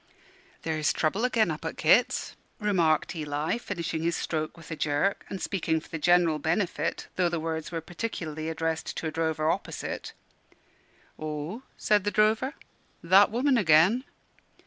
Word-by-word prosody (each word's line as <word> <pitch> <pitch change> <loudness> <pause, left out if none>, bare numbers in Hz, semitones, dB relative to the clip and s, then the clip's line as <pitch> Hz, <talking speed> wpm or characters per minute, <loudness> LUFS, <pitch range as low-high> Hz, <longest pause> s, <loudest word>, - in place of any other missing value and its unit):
"There's 155 -2 +1
trouble 195 +10 +1
agen, 220 -7 +2
up 155 - -6
at 160 - -4
Kit's," 190 +10 +3 0.2
remarked 175 -6 +2
Eli, 150 +6 -2
finishing 170 -7 -3
his 170 +1 0
stroke 155 +1 -3
with 165 0 -12
a - - -2
jerk, 155 +7 0
and 195 - -5
speaking 165 -5 0
for - - -16
the 165 - -4
general 175 -2 +4
benefit, 175 +5 -1
though 180 -2 +3
the 170 -1 -2
words 160 0 -3
were 165 -1 -3
particularly 160 -4 -4
addressed 160 0 -2
to - - -4
a 160 - -1
drover 160 -1 0
opposite. - - -3 1.1
"Ho?" 155 - -4 0.2
said 210 -2 +2
the 205 - +1
drover: 215 +6 +2 0.5
"that 190 +4 +6
woman 250 +3 +2
agen?" 185 +7 +5
165 Hz, 150 wpm, -28 LUFS, 155-200 Hz, 1.1 s, that